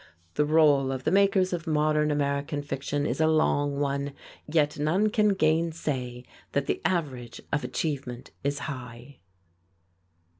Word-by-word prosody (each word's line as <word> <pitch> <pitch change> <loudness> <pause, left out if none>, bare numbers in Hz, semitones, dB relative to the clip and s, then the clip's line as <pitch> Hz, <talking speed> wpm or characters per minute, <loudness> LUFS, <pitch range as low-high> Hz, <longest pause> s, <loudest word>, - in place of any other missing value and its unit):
The 150 - +2
roll 145 -3 +4
of 130 -1 -4
the 155 - +1
makers 195 -1 +3
of 170 -1 -4
modern 150 0 +2
American 145 0 -1
fiction 145 +1 -2
is - - -1
a 155 - +4
long 145 -2 +2
one, 140 0 -1 0.3
yet 150 -2 +1
none 185 +9 +2
can 210 -3 +3
gainsay 155 -7 0 0.3
that 140 -1 +1
the - - -2
average 135 -10 -2
of 145 - +1
achievement 135 -5 -4
is 140 +1 0
high. 125 -1 -8
145 Hz, 140 wpm, -27 LUFS, 140-160 Hz, 0.3 s, roll